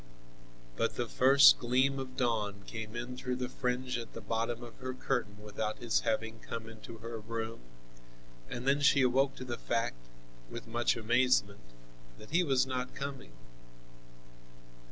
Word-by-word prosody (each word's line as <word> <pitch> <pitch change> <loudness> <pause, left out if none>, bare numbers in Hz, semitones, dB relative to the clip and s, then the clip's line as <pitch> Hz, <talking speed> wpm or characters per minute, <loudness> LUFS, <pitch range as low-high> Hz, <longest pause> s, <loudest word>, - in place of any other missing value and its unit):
But - - 0
the 120 - -1
first 135 +4 +7
gleam 130 +3 +2
of 130 -1 -7
dawn 105 -5 0
came 110 0 -6
in 120 +2 -4
through 125 0 -3
the 125 0 -2
fringe 125 0 -1
at 115 - -8
the - - -6
bottom 115 +1 -2
of 120 - -10
her 130 -1 -5
curtain 120 -6 -2
without 105 +1 -3
his 120 -2 +1
having 115 0 -1
come 115 0 -6
into 115 0 -10
her 115 +1 -6
room, 115 +1 -4 0.9
and 120 +2 -5
then 140 +1 +3
she 140 -1 +5
awoke 135 +2 +3
to 130 - -7
the 120 -2 -4
fact, - - -2 0.4
with 115 - -7
much 115 +1 +1
amazement, 115 -3 +2 0.6
that 105 - -13
he 175 +3 +4
was 135 -5 +3
not 130 -1 -3
coming. 135 - -6
120 Hz, 155 wpm, -32 LUFS, 115-130 Hz, 0.9 s, first